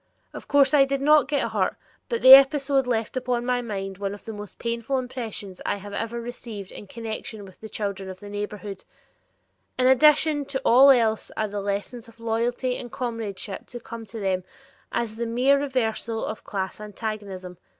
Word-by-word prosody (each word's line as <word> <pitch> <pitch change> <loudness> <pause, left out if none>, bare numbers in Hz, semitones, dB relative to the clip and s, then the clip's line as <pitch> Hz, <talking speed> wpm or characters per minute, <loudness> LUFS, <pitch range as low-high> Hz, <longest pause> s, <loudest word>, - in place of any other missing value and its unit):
Of - - -9
course 280 -1 +4
I 285 -2 +7
did 275 0 -1
not 295 -1 +5
get 285 0 0
hurt, - - 0 0.3
but 470 - -2
the 260 - +12
episode 275 -1 +6
left 230 -1 -1
upon 250 -1 -1
my 250 0 +1
mind 195 -4 -5
one 200 0 -3
of 205 - -16
the 225 - -6
most 205 -1 -9
painful 235 +3 -2
impressions 230 -7 -5
I - - 0
have 205 0 -9
ever 230 +3 -3
received 230 -4 -7
in 205 - -10
connection 220 -1 -6
with 190 - -16
the 220 - -8
children 200 -3 -4
of 185 0 -8
the 205 - -10
neighborhood. 205 -1 -5 0.9
In 255 - +2
addition 295 +3 +5
to 265 0 -3
all 260 +4 +7
else 225 -4 +3
are 215 - 0
the 205 0 -4
lessons 205 +4 -4
of 230 0 -18
loyalty 235 +3 -1
and 240 - -8
comradeship 225 -6 -5
to 240 - -8
come 230 -1 -9
to 220 +3 -7
them 190 -2 -1 0.5
as 225 -2 -2
the 235 0 -2
mere 255 +5 +3
reversals 235 -4 -1
of 220 - -6
class 195 0 -4
antagonism? 205 -4 -6
230 Hz, 185 wpm, -25 LUFS, 205-255 Hz, 0.9 s, the